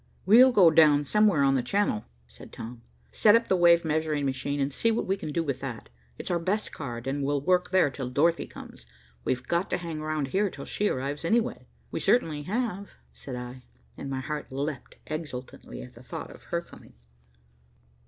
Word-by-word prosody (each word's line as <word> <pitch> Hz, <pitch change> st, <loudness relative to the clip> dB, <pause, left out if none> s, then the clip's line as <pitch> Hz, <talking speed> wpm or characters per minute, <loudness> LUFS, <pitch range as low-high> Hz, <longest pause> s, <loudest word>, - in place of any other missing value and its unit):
"We'll 245 Hz, +7 st, +8 dB
go 185 Hz, -8 st, +6 dB
down 150 Hz, -2 st, +5 dB
somewhere 205 Hz, -2 st, +3 dB
on 135 Hz, 0 st, +4 dB
the 130 Hz, -, +2 dB
Channel," 125 Hz, -, 0 dB, 0.2 s
said -, -, -14 dB
Tom, 115 Hz, +1 st, -8 dB, 0.3 s
"set 210 Hz, -, +5 dB
up 230 Hz, 0 st, +2 dB
the 190 Hz, -, +3 dB
wave 170 Hz, -1 st, +5 dB
measuring 155 Hz, -2 st, 0 dB
machine, 140 Hz, +2 st, -2 dB
and 140 Hz, 0 st, -1 dB
see 230 Hz, -, +1 dB
what 225 Hz, -, 0 dB
we 190 Hz, -, +1 dB
can 155 Hz, -, -6 dB
do 165 Hz, +2 st, 0 dB
with 140 Hz, -5 st, -3 dB
that. 125 Hz, -5 st, -7 dB, 0.3 s
It's -, -, -4 dB
our 175 Hz, -, +1 dB
best 195 Hz, +6 st, -1 dB
card, 120 Hz, -3 st, -6 dB
and 140 Hz, +1 st, -2 dB
we'll 145 Hz, +1 st, +1 dB
work 180 Hz, +3 st, +2 dB
there 185 Hz, -6 st, +3 dB
till 130 Hz, -1 st, -5 dB
Dorothy 165 Hz, +6 st, +2 dB
comes. 60 Hz, -, -12 dB, 0.4 s
We've 125 Hz, 0 st, -2 dB
got 175 Hz, +2 st, 0 dB
to -, -, 0 dB
hang 165 Hz, -3 st, -5 dB
round 155 Hz, -3 st, -2 dB
here 200 Hz, +6 st, +1 dB
till -, -, -9 dB
she 210 Hz, -, 0 dB
arrives, 140 Hz, +4 st, -3 dB
anyway." 230 Hz, +7 st, 0 dB, 0.2 s
"We -, -, -2 dB
certainly 160 Hz, -11 st, +2 dB
have," 205 Hz, -2 st, -2 dB, 0.2 s
said 130 Hz, -, -8 dB
I, 125 Hz, +1 st, -7 dB, 0.3 s
and 140 Hz, -, -7 dB
my 135 Hz, -1 st, -3 dB
heart 150 Hz, +1 st, -4 dB
leaped 140 Hz, 0 st, -4 dB
exultantly 150 Hz, -5 st, -7 dB
at 125 Hz, -, -12 dB
the 120 Hz, -, -14 dB
thought 125 Hz, -, -7 dB
of -, -, -15 dB
her 170 Hz, -, -2 dB
coming. -, -, -16 dB
155 Hz, 200 wpm, -27 LUFS, 135-180 Hz, 0.4 s, We'll